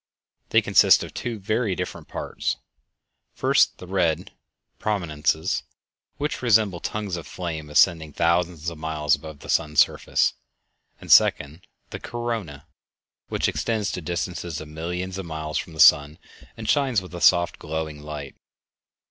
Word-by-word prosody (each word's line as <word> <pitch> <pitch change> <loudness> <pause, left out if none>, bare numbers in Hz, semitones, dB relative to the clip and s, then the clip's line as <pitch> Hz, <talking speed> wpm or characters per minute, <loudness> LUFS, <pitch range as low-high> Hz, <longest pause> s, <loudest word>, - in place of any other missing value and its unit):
They - - +4
consist - - +5
of - - -9
two 120 -2 -4
very 105 0 -1
different - - -6
parts—first, - - -2
the - - -10
red 90 0 0 0.5
"prominences," 80 -4 -1 0.6
which 150 +1 -3
resemble 110 -7 +3
tongues 100 -3 -3
of 85 - -8
flame 80 -4 -5
ascending 80 0 +3
thousands 85 0 0
of 80 - -10
miles 75 -2 0
above 80 -2 -4
the - - -11
sun's 75 -2 +1
surface; - - +3 0.7
and, - - -6
second, 75 +5 +4 0.2
the - - -6
"corona," 115 - -5 0.6
which - - 0
extends 110 -3 -1
to 90 - -5
distances 85 -1 -4
of 80 - -9
millions 90 +4 -4
of 95 - -6
miles 80 -1 -3
from 85 - -7
the 80 - -11
sun, 75 0 +6 0.4
and 110 -1 -7
shines 135 -4 +2
with 90 -1 -12
a 85 - -6
soft, 85 -1 +4
glowing 80 -1 -5
light. 75 -1 -7
85 Hz, 140 wpm, -24 LUFS, 80-95 Hz, 0.7 s, sun